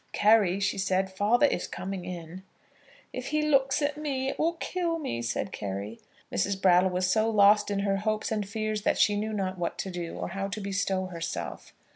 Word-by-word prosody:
"Carry," 205 -3 +4
she 200 0 0
said, 190 0 0
"father 220 +8 +3
is - - 0
coming 190 -1 -5
in." 175 0 -7 0.7
"If 255 0 -5
he 305 0 0
looks 275 -1 +2
at 290 0 0
me, 270 -3 -1
it - - -5
will 330 +2 +2
kill 340 0 -2
me," 120 - -3
said 115 -3 -2
Carry. 100 +3 -5 0.3
Mrs. 195 -1 0
Brattle 185 0 +5
was 180 0 0
so 220 +4 +2
lost 210 -1 +5
in 200 -1 0
her 200 -1 +1
hopes 215 +2 -1
and 210 -3 -2
fears 215 0 -2
that - - +1
she 205 - +4
knew 215 +2 -2
not 190 -3 -2
what 170 - -2
to 190 - -4
do, 175 -2 -5
or - - -4
how 195 +2 -3
to 200 +2 -5
bestow 195 -1 -1
herself. 170 -3 -6
200 Hz, 200 wpm, -28 LUFS, 185-225 Hz, 0.7 s, Brattle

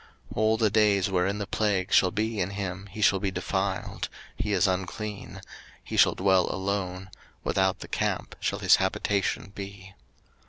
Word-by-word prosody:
03:013:046 - - -9
All 110 +1 +3
the 110 -1 +3
days 105 -3 +3
wherein 95 +2 +1
the 100 - -3
plague 100 -1 0
shall 90 - +6
be 110 +2 -2
in 90 - 0
him 100 -1 -5
he 105 +2 -8
shall 95 - +5
be 100 - -1
defiled; 95 0 -2 0.3
he 105 - -2
is 95 -3 +3
unclean: 95 +2 -3 0.4
he - - -6
shall - - +5
dwell 95 -1 +3
alone; 95 -1 -3 0.3
without 95 -1 +1
the - - -7
camp - - -2
shall - - -1
his - - +5
habitation 95 0 -1
be. 100 -1 -9
100 Hz, 165 wpm, -27 LUFS, 95-105 Hz, 0.4 s, shall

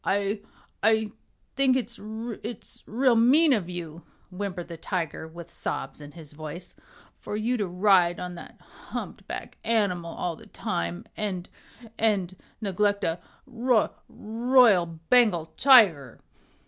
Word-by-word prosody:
"I 200 +1 0 0.4
I 220 -1 +3 0.4
think 265 -1 +4
it's 235 -2 -5
it's 220 +2 -7
real 245 +2 +3
mean 275 +7 +5
of 190 -7 -1
you," 170 -2 -7 0.3
whimpered 180 -2 -5
the 170 - -7
tiger 165 -2 -4
with 170 +1 -11
sobs - - -4
in 145 0 -11
his 160 -4 -10
voice, 155 +3 -7 0.4
"for 210 - -5
you 230 +4 0
to 205 -4 -1
ride 180 -1 +3
on 180 0 -5
that 170 - -11
humpbacked - - -8
animal 185 -7 0
all 170 0 -3
the - - -15
time, 85 0 -3
and 190 -4 -3 0.5
and 195 -5 +1 0.3
neglect 205 0 0
a 165 +1 0 0.3
roy 240 -1 +1 0.2
royal 225 -4 +3
Bengal 165 +1 +2
tiger!" 205 - +5
200 Hz, 130 wpm, -26 LUFS, 170-225 Hz, 0.5 s, mean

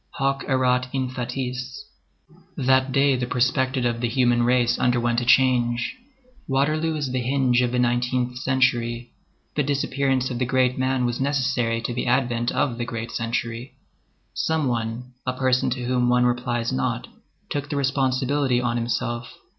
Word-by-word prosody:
Hoc 135 0 0
erat 125 -1 +2
in 130 -2 -1
fatis. 125 - -5 0.7
That 130 -1 +2
day 135 +1 +3
the 125 -1 -2
perspective 130 +1 +1
of 120 -1 -1
the 120 - 0
human 120 -1 +2
race 120 0 +2
underwent 120 -1 +1
a - - -3
change. 120 - +3 0.5
Waterloo 155 +4 +1
is 145 -4 -2
the 130 0 -1
hinge 125 -1 +2
of 125 -1 0
the 125 - -1
nineteenth 125 0 0
century. 120 -2 0 0.4
The 150 - +1
disappearance 135 -2 0
of 120 - -3
the 125 - +1
great 130 0 +2
man 130 -1 0
was 120 +1 -2
necessary 130 -4 0
to 120 - -3
the 125 - -3
advent 120 -1 +1
of 125 -5 -1
the 120 - -1
great 115 -2 -5
century. 115 +1 -3 0.6
Some 160 -3 0
one, 120 +1 -3
a 130 - +1
person 130 0 +1
to 125 0 -3
whom 125 0 +1
one 125 0 +3
replies 120 -1 -1
not, 65 - -1 0.4
took 145 0 -3
the - - -2
responsibility 135 -1 +1
on 120 -1 -1
himself. 120 0 -3
125 Hz, 160 wpm, -23 LUFS, 120-130 Hz, 0.7 s, day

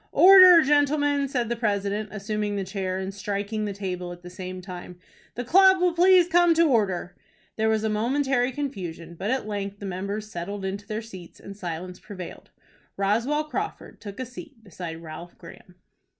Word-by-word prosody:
"Order, 370 -3 +9
gentlemen!" 290 0 +2
said 250 -4 -1
the 235 - -1
president, 205 -2 -1
assuming 210 0 -3
the 200 - -2
chair, 190 -1 -3
and 190 +1 -4
striking 205 +1 -3
the 205 - -3
table 180 -3 -5
at 175 0 -11
the 180 - -10
same 185 0 -7
time. 180 -1 -9 0.4
"The 245 - -3
club 380 +7 +6
will 355 -1 +2
please 360 0 +5
come 350 -1 +4
to 335 - +5
order." 205 - +1 0.4
There 220 0 +1
was 220 -1 +1
a - - +1
momentary 250 +4 +1
confusion, 185 - -6
but 190 +5 -4
at 260 -2 -1
length 200 -1 -4
the 200 - -8
members 200 +3 -4
settled 195 +3 -5
into 200 +1 -5
their 220 +1 -4
seats, 185 -6 -12
and 200 - -10
silence 180 -1 -6
prevailed. 185 -5 -10 0.5
Roswell 230 +10 +1
Crawford 400 +7 -6
took 200 0 -9
a 255 - -3
seat 250 0 -12
beside 170 -4 -8
Ralph 165 +2 -10
Graham. 180 - -14
210 Hz, 180 wpm, -25 LUFS, 190-265 Hz, 0.5 s, Order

